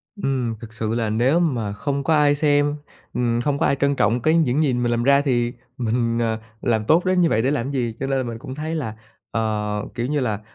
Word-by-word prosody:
Ừm, 130 - -1
thực 115 0 -10
sự 110 0 -2
là 115 -2 0
nếu 125 +9 +2
mà 120 -12 0
không 140 +5 -2
có 160 - +2
ai 145 -1 +4
xem, 145 0 +2 0.4
ừm, 120 -1 0
không 145 +1 0
có - - +2
ai - - +3
trân 140 +1 +1
trọng 120 -2 +2
cái 155 +6 +3
những 150 -1 +2
gì 135 -4 +1
mình 120 -1 0
làm 120 0 0
ra 140 +2 +5
thì 120 -4 0 0.2
mình, 115 -1 0
ờ, 110 -1 0 0.2
làm 110 -3 0
tốt 170 +7 +3
đến 185 -1 +3
như 170 - +4
vậy 110 - +2
để 130 - +1
làm 135 -2 -1
gì? 120 -5 -1
Cho 135 - -2
nên 135 0 0
là 130 - 0
mình 115 -1 -5
cũng 130 +3 -7
thấy 155 +2 -3
là, 115 -9 -3 0.4
ờ, 105 -2 -1
kiểu 120 0 -2
như 150 +1 0
là, 110 -6 -1
125 Hz, 250 wpm, -22 LUFS, 115-145 Hz, 0.4 s, ra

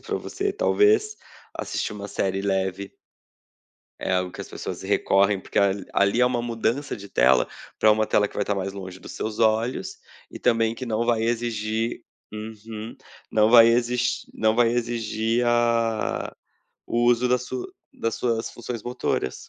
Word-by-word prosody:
para - - -3
você? 395 0 -3
Talvez 430 -2 +3 0.4
assistir - - -3
uma 100 -1 -7
série 95 -1 -1
leve 95 0 -2 1.1
é - - -2
algo 90 0 0
que - - -8
as - - -7
pessoas - - -6
recorrem, 100 +1 +2
porque - - -3
a 100 -1 +5 0.2
ali 100 +5 +2
há 125 - +6
uma 120 -1 0
mudança 120 +4 -1
de 100 0 -11
tela 65 -8 +4 0.3
para 110 - +5
uma 110 0 +1
tela 105 - +3
que - - -18
vai 105 - 0
estar 105 - -1
mais 95 0 -3
longe 95 -2 -8
dos - - -10
seus 110 -1 -4
olhos 115 - +1 0.3
e - - -9
também 115 -2 +2
que 130 - -6
não 115 0 0
vai 115 -2 +2
exigir 115 -1 -1 0.3
uhum, 110 +1 -8 0.3
não 110 0 +4
vai 115 -1 +9
exis 120 +1 +1
não 110 0 +2
vai 120 -1 +5
exigir 115 -1 -1
ah, 115 -2 +1 0.5
o 120 0 0
uso 120 +1 +3
das 125 0 +1
sua 125 0 -5 0.3
das 115 0 -1
suas 115 -1 -1
funções 120 -1 -6
motoras. 120 - -2
115 Hz, 165 wpm, -24 LUFS, 105-120 Hz, 1.1 s, vai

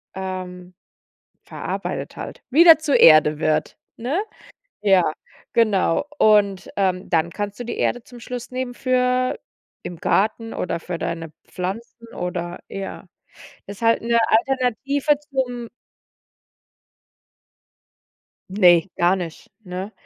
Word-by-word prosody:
ähm, 185 -1 -6 0.7
verarbeitet - - -5
halt - - -8
wieder 330 +4 +8
zur 310 -3 +2
Erde 155 -1 +7
wird, 155 -1 0 0.2
ne? 270 - -1 0.6
Ja, 195 -3 +5 0.5
genau. 215 - +2
Und, 200 -3 +3
ähm, 185 -2 -1
dann 170 0 +1
kannst 205 +1 -5
du - - -3
die 240 - -5
Erde 245 -1 -1
zum 245 -1 -13
Schluss 245 0 -7
nehmen 255 -1 -4
für 255 0 +1 0.5
im 175 - -7
Garten 220 +5 0
oder 175 - -2
für 175 -1 -5
deine 165 -2 -4
Pflanzen 225 +5 -6
oder 175 -1 -4
ja. 195 -1 -7 0.6
Das 200 - -8
ist - - -15
halt 230 0 +3
'ne 235 0 +2
Alternative 270 +4 +1
zum 245 -3 -2 2.8
Ne, 180 -2 +4
gar 175 +2 +3
nicht, 170 -4 -7
ne? 185 +2 -6
205 Hz, 115 wpm, -22 LUFS, 180-245 Hz, 2.8 s, wieder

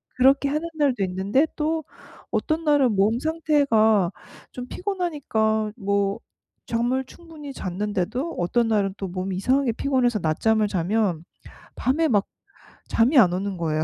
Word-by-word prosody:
그렇게 270 +2 +4
하는 305 +4 -2
날도 270 -9 +1
있는데 195 +11 +1
또 315 +1 -1 0.5
어떤 320 +1 -1
날은 290 -5 +3
몸 210 +4 +2
상태가 275 - +2 0.4
좀 250 0 -7
피곤하니까 275 - -1
뭐 200 0 -1 0.5
잠을 245 +3 0
충분히 310 -2 -11
잤는데도 205 - -3
어떤 225 +7 +1
날은 200 -3 +1
또 195 - -4
몸이 185 +1 -4
이상하게 255 +4 +1
피곤해서 245 -2 0
낮잠을 210 +7 +1
자면 185 -2 0 0.5
밤에 310 +5 +1
막 205 -5 +2 0.6
잠이 255 +5 +4
안 180 -7 +5
오는 195 +2 -2
거예요. 155 -2 -1
225 Hz, 285 characters per minute, -24 LUFS, 195-280 Hz, 0.6 s, 안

